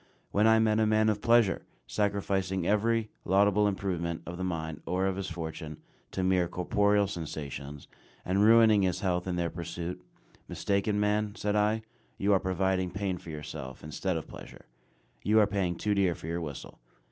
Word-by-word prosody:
When 105 +2 +3
I 110 0 +6
met 110 -1 +3
a 110 - +3
man 110 0 +3
of 105 -1 -1
pleasure, 115 -4 +4 0.2
sacrificing 95 +5 -1
every 110 +2 +1
laudable 100 +2 +3
improvement 85 -4 -2
of 85 - -6
the - - -2
mind, 80 -3 -3
or 95 +1 0
of 95 -1 0
his 95 0 -4
fortune, 80 -2 -6 0.3
to 95 - -3
mere 90 -1 +2
corporeal 100 +4 +2
sensations, 75 -5 -6 0.4
and 95 +3 +2
ruining 110 -1 +6
his 95 -1 0
health 90 -2 0
in 90 - -1
their 85 -1 -1
pursuit 85 +1 -5 0.4
"Mistaken 100 +1 0
man," 105 0 0
said 105 -2 -1
I, 105 +1 +2 0.3
"you 100 +1 +2
are 95 - +4
providing 95 0 0
pain 95 -1 -3
for 85 - -11
yourself, 75 -4 -7
instead 80 +4 -2
of 80 - -6
pleasure; - - -12 0.6
you 110 +1 +4
are 105 - +6
paying 95 -3 -1
too 105 +4 0
dear 95 -4 +2
for - - -11
your 85 +1 -2
whistle." 75 -4 -7
95 Hz, 175 wpm, -29 LUFS, 85-105 Hz, 0.6 s, I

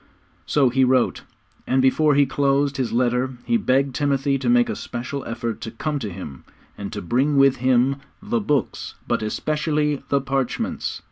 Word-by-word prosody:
So 140 -4 +3
he 130 +2 +2
wrote, 130 -1 +2 0.5
and 130 - +2
before 145 +3 +3
he 140 0 +5
closed 140 0 +1
his 130 -3 -1
letter 125 +2 0
he 235 - +1
begged 135 - +1
Timothy 140 -1 0
to 125 -2 -1
make 120 0 +4
a - - -3
special 125 +3 -5
effort 115 -1 -4
to - - -5
come 145 +6 -3
to 110 -5 -4
him, 80 -8 -9 0.3
and - - -6
to - - -5
bring 135 - +1
with 135 -1 +5
him 130 +2 +2 0.3
'_the 225 +1 -1
books, 145 -8 -1
but - - 0
especially 150 +5 -1
the 140 - +3
parchments. 135 -1 -2
135 Hz, 175 wpm, -22 LUFS, 125-145 Hz, 0.5 s, he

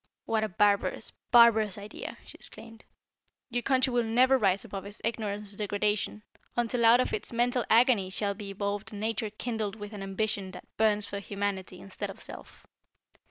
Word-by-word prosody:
"What 220 -1 +1
a 215 - -1
barbarous, 205 +2 +1 0.2
barbarous 225 -4 +6
idea!" 205 +1 -7
she - - -9
exclaimed. 225 -1 -11 0.7
"Your 245 0 0
country 260 0 +2
will 240 - +3
never 245 +4 +4
rise 195 -6 +2
above 195 -1 -6
its 205 +1 -10
ignorance 210 -3 -3
and 200 - -12
degradation, 210 0 -1 0.3
until 240 0 +1
out 235 +2 +7
of 255 - 0
its 435 - -1
mental 245 +1 +1
agony 230 -5 +5
shall 200 +2 -1
be 200 0 -8
evolved 200 +2 -3
a - - -8
nature 220 +1 -1
kindled 215 -1 -3
with 205 0 -8
an 205 - -7
ambition 195 0 -2
that 180 - -10
burns 210 -1 +2
for 200 - -5
Humanity 200 -2 -3
instead 195 - -6
of - - -9
self. - - -10
210 Hz, 175 wpm, -29 LUFS, 200-230 Hz, 0.7 s, out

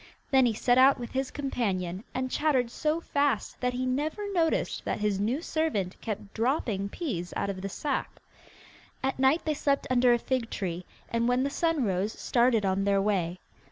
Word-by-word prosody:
Then 265 -2 +5
he 230 - +1
set 245 +3 +3
out 265 +1 +6
with 240 - -6
his 265 0 -1
companion, 195 - -2
and 255 0 -3
chattered 260 -6 +1
so 310 +5 0
fast 285 -3 0
that 250 0 0
he 255 +1 -2
never 300 +11 -1
noticed 330 -3 +1
that - - -2
his 210 -2 0
new 240 +10 0
servant 255 - -1
kept 210 -2 -5
dropping 225 -5 0
peas 195 - -4
out 200 - -1
of 185 -1 -7
the 195 - -4
sack. 280 +7 -3 0.8
At 265 0 -1
night 270 +5 +3
they 310 - +1
slept 280 -1 0
under 250 0 +5
a 240 - +5
fig 240 -1 -2
tree, 180 -2 -4 0.2
and 230 0 +1
when 250 +1 +2
the 280 - -1
sun 330 -3 +1
rose 195 0 0
started 235 -3 +2
on 190 +1 +1
their 200 0 +3
way. 185 -4 0
245 Hz, 190 wpm, -28 LUFS, 200-275 Hz, 0.8 s, out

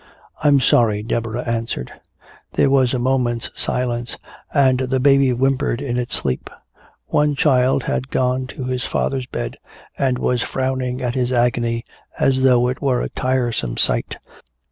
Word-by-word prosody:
"I'm 145 -2 +5
sorry," 110 -4 +3
Deborah 115 +1 -2
answered. 115 - -3 0.6
There 135 - +3
was 130 -2 +3
a - - +1
moment's 120 -2 0
silence, 120 -1 -2 0.3
and 130 -3 +3
the 130 0 0
baby 135 0 +4
whimpered 130 0 +1
in 135 -4 -3
its 125 0 -2
sleep. 65 -2 -3 0.6
One 150 -1 +2
child 135 -4 +3
had 135 0 -2
gone 130 0 0
to 130 - -7
his 125 0 -2
father's 130 -2 -1
bed - - -5 0.4
and 130 -2 0
was 125 -1 0
frowning 130 -1 -2
at 120 -1 -1
his 125 -1 0
agony 120 -1 +1 0.3
as 130 -1 +2
though 125 -2 +4
it 125 +1 -3
were 130 -3 +1
a - - -3
tiresome 120 - -1
sight. - - +1
125 Hz, 150 wpm, -20 LUFS, 120-130 Hz, 0.6 s, I'm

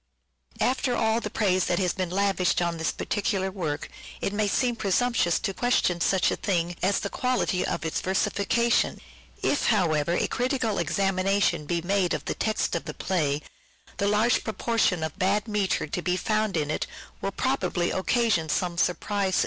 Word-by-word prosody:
After 255 -1 +1
all 220 +1 +1
the - - -4
praise 185 -4 +1
that 175 - 0
has 180 -1 +1
been 185 -2 -2
lavished 190 -1 +1
on 170 -1 -1
this 160 - 0
particular 195 -2 -1
work 160 -6 -3 0.3
it 200 - -2
may 210 0 +1
seem 240 +4 +1
presumptuous 220 -3 +1
to 195 - -2
question 185 -7 +1
such 190 +2 +3
a - - 0
thing 175 -3 -1
as 195 +2 +2
the - - -2
quality 250 -7 0
of 170 -2 -2
its 160 - -1
versification. 200 +5 +1 0.4
If, 285 - +1
however, 170 -7 +2
a - - +1
critical 250 -4 -1
examination 195 -4 +1
be 170 +1 0
made 190 -1 +1
of - - -6
the - - -1
text 215 -1 -1
of 165 - -3
the 150 - -6
play, 150 -6 -1 0.5
the 200 - 0
large 215 +4 +3
proportion 220 -5 0
of 160 -2 -5
bad 200 +3 +1
metre 210 -3 0
to 155 +4 -3
be 180 +1 0
found 215 -2 0
in 150 -1 -1
it - - -2 0.3
will 195 - -2
probably 195 -7 0
occasion 190 -4 +1
some 175 +1 -1
surprise. 195 +1 +1
195 Hz, 175 wpm, -26 LUFS, 175-215 Hz, 0.5 s, such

